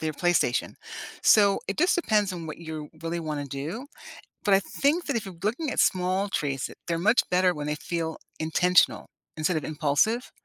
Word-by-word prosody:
their 155 -1 -2
PlayStation. 160 -6 +1 0.5
So, 200 -2 +5
it 195 - -4
just 360 - +4
depends 215 - +2
on 165 -2 -6
what 155 - -7
you 160 -2 -7
really 170 +1 -2
wanna 150 -3 -4
do, 150 - -5 0.6
but 200 - +4
I 195 - +6
think 300 - 0
that 280 - -2
if 225 - -1
you're 190 -3 -8
looking 255 +8 -1
at - - -2
small 185 +2 +2
treats, 135 -7 -2 0.2
they're 170 -1 0
much 220 +7 +4
better 180 0 +4
when 150 -1 -5
they 150 - 0
feel 165 +1 -3 0.2
intentional 180 +3 +3 0.3
instead 160 +2 +1
of 155 - -3
impulsive, 155 - +1
175 Hz, 185 wpm, -26 LUFS, 155-205 Hz, 0.6 s, I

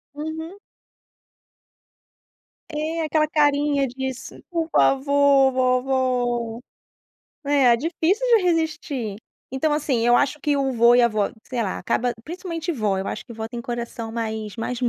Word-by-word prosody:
Uhum. 320 +5 -6 2.1
É, 315 +2 -3
aquela 305 0 +1
carinha 290 -2 +2
diz: 265 +1 -5 0.2
"Por 330 -2 -1
favor, 275 0 +4
vovó". 250 -2 0 0.9
É, 275 -4 +4
difícil 335 - 0
de 420 - +1
resistir. 305 - -1 0.4
Então 295 +3 0
assim, 265 -6 0
eu 240 - +5
acho 285 +1 +1
que 290 -1 +1
o 270 -1 0
vô 235 0 +5
e 245 - +5
a 235 - +5
vó, 215 -2 0
sei 250 -2 -4
lá, 200 -4 -2
acaba 245 +6 0
principalmente 340 +1 -5
vó, 210 - 0
eu 190 - -3
acho 215 - -6
que 235 - -9
vó 220 0 -6
tem 235 0 -6
coração 235 -1 -5
mais 220 -2 -4
mais 235 +2 -4
mole 245 - +2
265 Hz, 145 wpm, -23 LUFS, 235-305 Hz, 2.1 s, eu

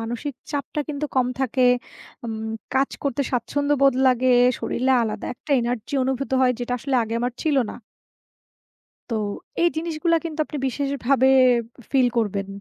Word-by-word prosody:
মানসিক 240 +5 -4 0.2
চাপটা 290 0 -3
কিন্তু 300 0 -2
কম 255 - +4
থাকে, 260 0 +1 0.6
উম 220 -1 -4 0.3
কাজ 270 +1 +2
করতে 280 -1 0
স্বাচ্ছন্দ্যবোধ 275 +2 +2
লাগে, 255 0 +3 0.3
শরীলে 260 +2 0
আলাদা 220 -2 -3
একটা 295 - -14
এনার্জি 235 +2 -3
অনুভূত 265 +1 -2
হয় 255 -1 +4
যেটা 245 0 -3
আসলে 275 +2 -3
আগে 225 +1 -4
আমার 245 +1 -1
ছিল 305 -3 +1
না। - - -8 1.4
তো - - -2 0.5
এই 345 - +5
জিনিসগুলা 330 +1 +1
কিন্তু 320 -2 -6
আপনি 300 - -6
বিশেষ 275 +2 -2 0.2
ভাবে 265 0 +4 0.6
ফিল 260 -3 +4
করবেন। 200 -3 0
265 Hz, 150 wpm, -23 LUFS, 240-285 Hz, 1.4 s, এই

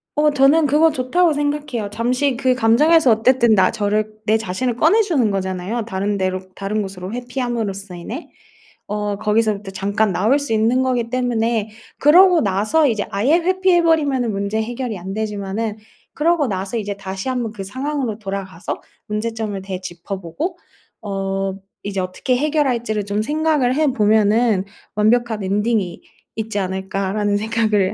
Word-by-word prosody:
어 300 0 +3
저는 290 +3 +4
그거 305 +3 +4
좋다고 310 +6 +2
생각해요. 290 -7 -2
잠시 250 +5 0
그 255 0 +2
감정에서 260 +5 +4
어쨌든 235 +1 +4
나 190 -3 +4
저를 215 0 -1
내 215 +1 +3
자신을 225 +4 -2
꺼내 330 - +4
주는 295 - +1
거잖아요 195 +3 -2
다른 205 -1 -2
데로 185 -1 -1 0.2
다른 205 +2 -2
곳으로 190 0 -6
회피함으로써 240 -6 -3
인해. 225 - -7 0.5
어 210 -1 -2
거기서부터 210 -1 0
잠깐 200 +2 0
나올 215 +10 +2
수 285 -4 -5
있는 225 +4 +2
거기 245 -3 0
때문에 235 -3 0 0.3
그러고 350 +4 +6
나서 215 +11 +2
이제 215 -5 0
아예 230 +11 +2
회피해 370 0 +3
버리면은 285 -8 +2
문제 200 +2 -1
해결이 240 -1 -4
안 190 +2 -6
되지만은 210 0 -3 0.4
그러고 320 -1 +2
나서 195 +2 -3
이제 205 -2 -3
다시 195 +3 -5
한번 245 -4 -2
그 205 -3 -7
상황으로 260 +1 -3
돌아가서 195 -4 -5 0.3
문제점을 215 -1 -3
되짚어 185 0 -6
보고 310 - -4 0.4
어 195 -1 -2 0.3
이제 195 -1 -3
어떻게 185 +8 -1
해결할지를 245 -8 0
좀 205 +1 -1
생각을 300 -2 +1
해 310 +2 +2
보면은 215 -1 +3 0.3
'완벽한 220 0 +2
엔딩이 205 -1 0 0.3
있지 220 -1 -4
않을까.'라는 195 +2 -1
생각을 215 -3 +1
220 Hz, 350 characters per minute, -20 LUFS, 200-260 Hz, 0.5 s, 그러고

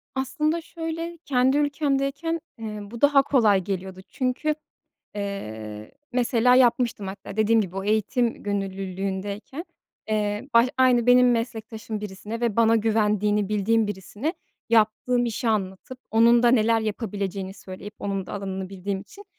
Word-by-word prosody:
Aslında 305 +5 0
şöyle, 330 +1 -5
kendi 260 +1 +3
ülkemdeyken, 290 +2 0 0.2
eee, 215 -2 -6
bu 220 +3 -9
daha 285 -1 +6
kolay 215 -9 +3
geliyordu 190 -1 -5
çünkü, 275 +4 -1 0.6
eee, 110 - -6 0.2
mesela 250 0 +3
yapmıştım 240 -4 +3
hatta 195 +1 -8
dediğim 220 +1 +4
gibi 190 -2 -4
o 195 - -3
eğitim 220 +3 0
gönüllülüğündeyken, 195 - -4 0.4
eee, 210 +3 -1
baş 235 +2 +6
aynı 250 -2 +4
benim 250 0 +6
meslektaşım 220 -2 -4
birisine 210 +3 -6
ve 230 -3 0
bana 230 0 +5
güvendiğini 210 -2 +1
bildiğim 215 +1 +2
birisine 205 - -4 0.4
yaptığım 230 +2 +2
işi 230 +1 -2
anlatıp, 210 +4 -2
onun 230 +2 +5
da 240 - +5
neler 230 -2 +4
yapabileceğini 200 -3 -3
söyleyip, 200 +2 -10
onun 195 -2 -3
da - - -8
alanını 190 -2 -4
bildiğim 195 0 -4
için 395 - -14
220 Hz, 135 wpm, -25 LUFS, 200-250 Hz, 0.6 s, daha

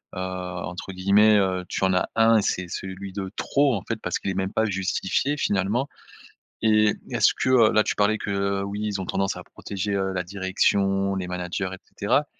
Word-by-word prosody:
heu, - - -4
entre 90 0 -5
guillemets, 100 +3 +4
heu, 95 -2 +1
tu - - -2
en 95 - +2
as 90 - +1
1 115 0 +5
et - - +1
c'est 90 -2 -1
celui 95 +2 -6
de 95 -1 -4
trop 140 -3 +2
en 95 - -3
fait. 115 - -1
Parce - - -2
qu'il - - -3
est - - -3
même 95 +1 -2
pas 110 - +2
justifié 100 +8 -1
finalement 105 +5 0 0.8
et 105 -1 +4 0.2
est-ce - - +4
que, - - -1
heu, 120 -4 +5
là 110 - +5
tu - - -1
parlais 105 +1 +2
que, 100 - -5
heu: 100 0 0
«Oui 100 +1 -4
ils 100 -2 -2
ont 95 - -4
tendance 95 0 -1
à - - -7
protéger, 100 +1 -4
heu, 95 -1 0
la 90 - -1
direction, 95 +1 +1
les 95 -1 -3
managers 90 +1 -3
et 95 - -7 0.2
cetera». 125 +8 +2
100 Hz, 215 wpm, -24 LUFS, 95-105 Hz, 0.8 s, 1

